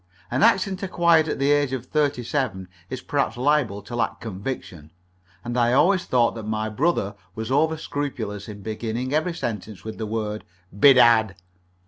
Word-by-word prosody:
An 130 +3 0
accent 190 +1 +3
acquired 170 -4 +3
at - - -2
the 140 +1 +2
age 145 -2 +2
of 130 -2 -4
thirty 145 -4 0
seven 115 -9 -2 0.2
is 130 -1 -5
perhaps 140 -4 -1
liable 125 -7 +1
to 120 - -7
lack 120 - -1
conviction, 95 - -6 0.5
and 120 0 -4
I 120 -1 +3
always 185 +7 +3
thought 120 -2 +2
that 115 - -6
my 110 0 -2
brother 110 - 0 0.2
was 110 +2 -5
over 160 +3 +2
scrupulous 115 -10 -4
in 100 -1 -9
beginning 115 +4 -3
every 160 +3 0
sentence 110 - -5
with 110 0 -7
the 110 - -3
word 105 -1 -3 0.3
"Bedad." 115 -3 +6
120 Hz, 165 wpm, -24 LUFS, 110-145 Hz, 0.5 s, Bedad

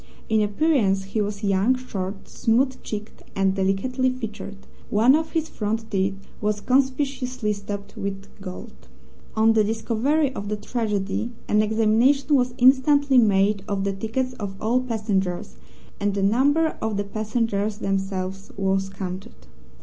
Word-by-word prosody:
In 220 -1 +3
appearance 210 -3 +2
he 195 +3 -2
was 205 0 -3
young, 200 +5 +3
short, 195 -6 -5
smooth 255 +3 +1
cheeked, 210 0 -7
and 195 -1 +2
delicately 200 +7 +1
featured. 215 -5 -7 0.2
One 225 +5 +5
of 315 +1 0
his 320 -2 0
front 220 -3 -3
teeth 195 -1 +1 0.3
was 210 0 0
conspicuously 255 -2 0
stopped 200 0 -7
with 195 0 -4 0.2
gold. 185 -2 -9 0.5
On 220 +1 +5
the 220 -1 +4
discovery 240 +7 +1
of 205 -4 -5
the 210 - 0
tragedy 210 -1 -2 0.2
an 210 - +3
examination 225 +7 +3
was 250 -3 +2
instantly 270 +1 +5
made 200 -2 +3
of 200 -2 -1
the 200 0 0
tickets 235 +6 -2
of 200 -2 -4
all 235 +4 +1
passengers, 195 - -2 0.4
and 200 0 0
the 200 - 0
number 285 +10 +3
of 220 -2 -1
the 205 - 0
passengers 215 0 -1
themselves 195 -1 -3
was 195 0 0
counted. 185 - -7
215 Hz, 140 wpm, -24 LUFS, 195-255 Hz, 0.5 s, One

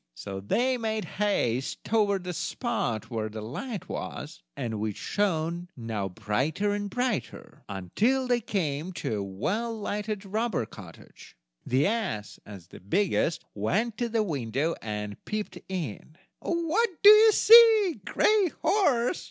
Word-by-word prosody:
So 95 +7 -6
they 245 - 0
made 220 -1 -2
haste 135 - -1
toward 205 -4 +1
the 180 0 -4
spot 125 - -2
where 110 -2 -2
the 110 0 -7
light 205 - -6
was, - - -6 0.2
and 110 -3 -3
which 105 -1 -3
shone 175 -3 -1
now 110 -4 -3
brighter 130 - -1
and 205 0 -3
brighter, 245 0 -3
until 215 - 0
they 245 -1 +2
came 170 -4 -2
to 110 -10 -3
a 100 - -2
well 205 - -2
lighted 210 -1 -4
robber's 215 - -1
cottage. 90 -5 -13 0.3
The 130 +3 +2
ass, 195 - -2
as 95 -5 -11
the - - -12
biggest, 170 - 0
went 205 - -1
to 240 -1 -1
the 225 -1 +1
window 140 - -1
and 105 -2 -5
peeped 210 -4 -4
in. 160 - -5 0.2
"What 340 +7 0
do 405 - +11
you 435 +1 +8
see, 440 -5 +7
Gray 425 -3 +3 0.2
horse?" 290 - +2
190 Hz, 140 wpm, -27 LUFS, -, 0.3 s, do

